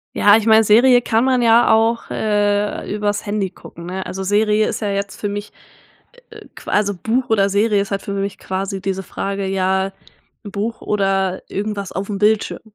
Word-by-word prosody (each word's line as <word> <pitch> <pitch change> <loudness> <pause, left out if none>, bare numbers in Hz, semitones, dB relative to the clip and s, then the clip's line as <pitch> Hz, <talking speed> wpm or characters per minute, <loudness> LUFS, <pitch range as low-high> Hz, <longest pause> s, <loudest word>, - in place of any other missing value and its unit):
Ja, 205 0 +6
ich 220 - -2
meine, 220 0 +6
Serie 245 +4 +5
kann 225 0 +1
man 260 -2 +2
ja 235 0 +5
auch, 225 +1 +1
äh, 205 -1 -1
übers 205 -1 -2
Handy 205 -2 -2
gucken, 170 -2 -12
ne? 185 +2 -5
Also, 190 +1 -5
Serie 210 +2 +2
ist - - -3
ja 210 - -2
jetzt 200 0 -4
für 205 - -2
mich, 205 +1 -6 0.8
äh, - - -13
qu - - -13
also, 205 -1 +1
Buch 230 +7 -2
oder 200 -3 +3
Serie 205 +1 +2
ist 200 - -4
halt 195 -1 -2
für 200 - -5
mich 200 0 -3
quasi 195 +1 -4
diese 190 0 -3
Frage, 195 +1 -4
ja, 190 0 0 0.5
'n 205 - -7
Buch 210 +4 -4
oder 195 -2 0
irgendwas 200 -1 -4
aufm 200 +2 -4
Bildschirm. 210 +1 +1
205 Hz, 190 wpm, -19 LUFS, 195-215 Hz, 0.8 s, Ja